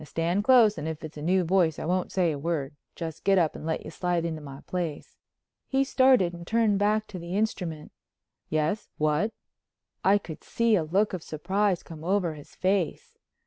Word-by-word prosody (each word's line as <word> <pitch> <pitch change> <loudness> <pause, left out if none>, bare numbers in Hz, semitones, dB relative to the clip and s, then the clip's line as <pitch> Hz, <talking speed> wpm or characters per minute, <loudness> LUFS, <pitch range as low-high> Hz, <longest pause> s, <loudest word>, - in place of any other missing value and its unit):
Now - - -9
stand 170 +6 0
close 225 -3 +5
and 155 - -4
if 160 -1 -5
it's 155 -1 -8
a - - -6
new 180 +4 +2
voice 170 -2 +2
I - - -5
won't 180 +2 0
say 180 -3 +2
a 145 - -4
word, 145 -2 -2 0.2
just 160 -2 -6
get 195 -1 +4
up 165 -4 +2
and 155 - -7
let 160 - -2
you - - -7
slide 175 -2 -1
into 160 -2 -3
my 140 -1 -9
place." 170 -5 -4 0.5
He 270 0 +2
started 260 -9 +4
and 170 0 -9
turned 220 -3 +2
back 210 +1 +2
to 185 - -7
the 170 +3 -4
instrument. 180 -8 -2 0.6
"Yes. 155 +7 -1
What?" 155 +8 +1 0.7
I 195 +2 +5
could 165 -6 -9
see 230 -1 +1
a 175 - +1
look 195 +7 +1
of 185 - -3
surprise 185 +5 -1
come 160 -2 -10
over 180 -2 +1
his 150 -2 -13
face. 185 -2 -1
175 Hz, 200 wpm, -27 LUFS, 160-205 Hz, 0.7 s, close